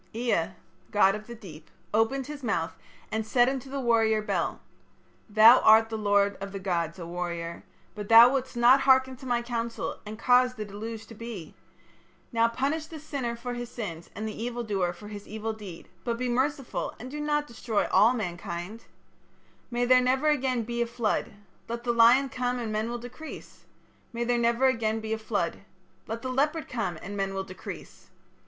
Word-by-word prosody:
"Ea, 230 -8 +1 0.4
god 200 -2 +4
of 215 +1 -7
the 235 - -8
deep, 165 -8 -12 0.2
opened 225 +5 +1
his 295 0 -7
mouth 205 -9 -1 0.4
and 220 0 -1
said 240 +3 +3
unto 265 0 -3
the 275 +1 -3
warrior 225 -3 +3
Bel: 215 - -2 0.7
'Thou 220 +4 +8
art 220 +1 +6
the 225 - -4
lord 205 -1 +2
of 195 0 -5
the 200 - -5
gods, 170 -3 -2
O 170 - -7
warrior. 170 -1 -4 0.3
But 210 -1 -7
thou 230 +3 +9
wouldst 260 -2 -2
not 245 +3 +6
hearken 260 -1 +4
to 260 - -10
my 240 -1 +1
counsel 235 -1 -3
and 215 +1 -8
caused 250 +1 +3
the 215 - -4
deluge 220 +2 -7
to - - -12
be. 220 -7 -8 0.8
Now 230 0 +3
punish 280 +7 -2
the 320 - -9
sinner 275 -6 -4
for 245 +1 -5
his 240 -1 -5
sins 175 -9 -6
and 215 +3 -4
the 215 - -4
evil 240 0 -3
doer 195 -5 0
for 190 +4 -11
his 205 -1 -9
evil 220 +1 -4
deed, 200 -6 -10 0.2
but 235 -1 -2
be 250 +1 -2
merciful 260 +2 -1
and 250 +3 -8
do 300 +1 -5
not 295 0 0
destroy 235 -4 -1
all 225 +4 +6
mankind. 175 +1 -5 0.8
May 240 0 0
there 255 +1 +6
never 260 +4 +2
again 260 -5 +1
be 235 +1 -3
a 235 - +1
flood. 230 -2 -1 0.4
Let 235 +1 -5
the 240 -1 +1
lion 240 +4 +6
come 250 -1 -1
and 230 -3 -3
men 215 +2 -1
will 240 - -3
decrease. 245 +6 -10 0.5
May 235 0 -2
there 240 0 +1
never 235 +2 +2
again 225 -4 +1
be 220 0 -3
a 220 - -3
flood. 205 -6 -2 0.5
Let 225 +1 -5
the 260 - -3
leopard 300 +5 0
come 195 -9 -3
and 200 +3 -6
men 195 -1 -2
will 195 - -2
decrease. 185 -1 -10
230 Hz, 190 wpm, -27 LUFS, 210-250 Hz, 0.8 s, thou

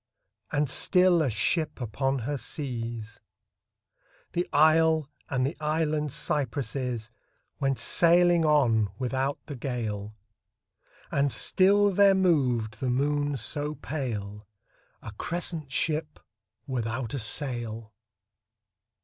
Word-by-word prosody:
And 145 0 +1
still, 180 +5 +4
a 145 - +1
ship 150 - 0
upon 135 +4 -2
her 130 +4 -3
seas, 115 -4 -5 1.1
The 175 +1 -2
isle 160 0 +4 0.2
and 130 -1 0
the 140 - -3
island 155 -1 -1
cypresses 130 -5 -2 0.5
Went 135 -2 0
sailing 175 0 +5
on 120 -9 +3
without 130 +3 -2
the 145 - -7
gale: 110 -5 -4 1.0
And 140 0 +1
still 200 +5 +4
there 200 0 +5
moved 125 - +1
the 130 - -2
moon 145 +2 0
so 145 +6 -3
pale, 105 -10 -5 0.6
A - - -7
crescent 165 -4 -3
ship 155 +1 -2 0.5
without 120 -3 -3
a 140 - -2
sail 115 -2 -3
140 Hz, 105 wpm, -27 LUFS, 120-155 Hz, 1.1 s, sailing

